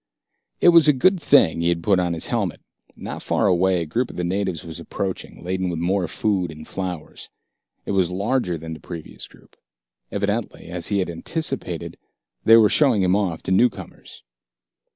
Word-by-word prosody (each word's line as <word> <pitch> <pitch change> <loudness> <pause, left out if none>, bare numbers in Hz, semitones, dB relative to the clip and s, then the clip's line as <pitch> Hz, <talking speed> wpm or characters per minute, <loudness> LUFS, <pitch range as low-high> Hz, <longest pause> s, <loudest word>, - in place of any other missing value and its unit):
It - - +7
was 170 -3 +7
a 150 - +6
good 180 +7 +3
thing 130 - +4
he 85 - +2
had 85 -1 -1
put 95 +1 +3
on 90 -1 0
his 80 - -1
helmet. - - -1 0.4
Not - - -6
far - - 0
away, 90 -2 +2
a - - -6
group 120 +11 -1
of - - -10
the 90 - -3
natives 90 -2 -2
was 80 -2 -7
approaching, 95 -2 -5
laden 95 +1 -2
with 85 - -3
more 90 +2 0
food 95 0 -1
and 80 0 -10
flowers. 90 -4 -6 0.6
It - - -3
was 95 -3 +2
larger 100 -1 -1
than 80 +1 -7
the 80 - -9
previous 85 -1 -8
group. - - -22 0.6
Evidently, 100 -2 -3
as 90 -1 -1
he 100 - +1
had 95 -2 0
anticipated, 160 - -4 0.5
they 115 +1 +8
were 110 -2 +6
showing 120 -4 +3
him 90 +1 +3
off 95 -6 -1
to - - -3
newcomers. 115 +4 -1
95 Hz, 185 wpm, -22 LUFS, 85-105 Hz, 0.6 s, they